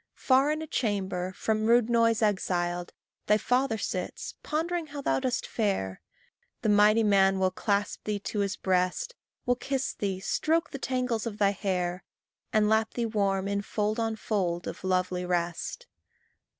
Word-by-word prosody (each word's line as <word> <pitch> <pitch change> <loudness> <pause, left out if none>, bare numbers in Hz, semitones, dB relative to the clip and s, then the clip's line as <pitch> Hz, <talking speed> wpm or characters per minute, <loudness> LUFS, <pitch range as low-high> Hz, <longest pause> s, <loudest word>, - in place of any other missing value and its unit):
Far 270 +2 +3
in 310 +1 -2
a - - -4
chamber 195 - -1
from 215 +2 0
rude 235 -1 +5
noise 230 -1 +3
exiled, 175 -4 0 0.4
Thy 210 - +5
father 250 +1 +1
sits, 185 -3 -4
pondering 330 +2 -2
how 285 -1 -6
thou - - +2
dost 255 -2 -1
fare. 190 - -1 0.6
The 220 - +2
mighty 210 +2 +5
man 195 -2 +4
will 190 -1 +2
clasp 200 +2 -1
thee 210 -1 -1
to 210 - -3
his 200 -1 0
breast: 185 - 0 0.3
Will 245 0 +2
kiss 270 +1 -2
thee, 195 -2 -2
stroke 315 - 0
the 275 - -6
tangles 250 -4 -1
of 210 -2 -5
thy 200 -2 +3
hair, 180 -3 -2 0.5
And 215 -1 +3
lap 220 +1 +2
thee 235 - 0
warm 200 -3 0
in 200 0 0
fold 210 +1 -1
on 225 -1 0
fold 180 -6 -1
of - - -6
lovely 185 -1 0
rest. 175 - -2
210 Hz, 165 wpm, -28 LUFS, 190-240 Hz, 0.6 s, rude